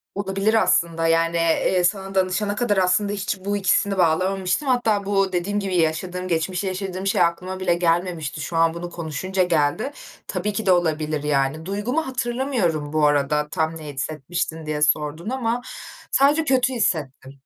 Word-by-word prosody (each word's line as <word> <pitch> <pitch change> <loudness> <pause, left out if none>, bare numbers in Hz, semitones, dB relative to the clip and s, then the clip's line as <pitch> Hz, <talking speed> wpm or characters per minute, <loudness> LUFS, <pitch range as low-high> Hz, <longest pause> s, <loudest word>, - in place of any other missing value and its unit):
Olabilir 200 +2 0
aslında, 165 -6 +2
yani, 165 +1 +2
eee, 165 +2 +2
sana 195 +1 -1
danışana 190 +2 +1
kadar 215 -4 0
aslında 190 +2 +2
hiç 190 -1 -3
bu 205 0 0
ikisini 195 +1 +1
bağlamamıştım. 185 - +1
Hatta 225 -6 +1
bu 195 -2 +1
dediğim 200 +4 -1
gibi 195 -2 -2
yaşadığım 180 +3 -1
geçmişte 180 +3 -1
yaşadığım 190 0 -4
şey - - +2
aklıma 185 +2 0
bile 180 -2 +2
gelmemişti. 170 -3 -1
Şu 165 - -5
an 165 0 +3
bunu 175 +1 -6
konuşunca 175 +3 -2
geldi. 165 - +1 0.4
Tabii 195 +3 -2
ki 220 - -3
de 190 - +4
olabilir, 155 -3 +1
yani. 145 +2 0
Duygumu 240 +11 -2
hatırlamıyorum 240 - -1
bu 155 -1 +3
arada, 145 +1 +1
"Tam 160 0 -1
ne 150 -2 -8
hissetmiştin?" 155 +3 -4
diye 150 -1 -3
sordun 150 +5 0
ama 245 -2 -1 0.5
sadece 290 +4 +4
kötü 260 -1 +2
hissettim. 145 - -2
180 Hz, 160 wpm, -22 LUFS, 160-200 Hz, 0.5 s, de